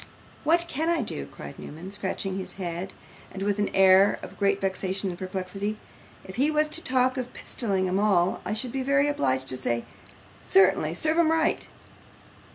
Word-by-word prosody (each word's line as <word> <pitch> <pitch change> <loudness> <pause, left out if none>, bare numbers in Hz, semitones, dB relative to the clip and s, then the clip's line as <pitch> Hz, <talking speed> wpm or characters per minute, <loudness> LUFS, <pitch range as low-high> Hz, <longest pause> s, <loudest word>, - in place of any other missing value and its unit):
'What 335 +3 +3
CAN 320 +1 -1
I 335 -6 +1
do?' 70 - -2
cried 70 0 -10
Newman, 170 +6 -8
scratching 195 -1 -3
his 190 - -6
head 180 0 -5 0.4
with 200 +1 0
an 205 - +1
air 195 +1 +6
of - - -10
great 200 -1 +2
vexation 190 0 -2
and 175 - -9
perplexity. 190 +3 -4 0.5
'If 190 +2 -9
he 280 +4 +3
was 305 0 +2
to 335 - -3
talk 255 0 +2
of 250 -1 -4
pistoling 195 -5 -1
'em 185 +2 0
all, 190 -4 +2
I 215 - -2
should 240 +2 -3
be 270 - -2
obliged 260 - +1
to 130 - -1
say, 120 -2 -1 0.6
"Certainly 390 +1 +3
serve 315 +1 +2
'em 330 -2 +4
right." 320 0 +1
200 Hz, 170 wpm, -26 LUFS, 185-270 Hz, 0.6 s, air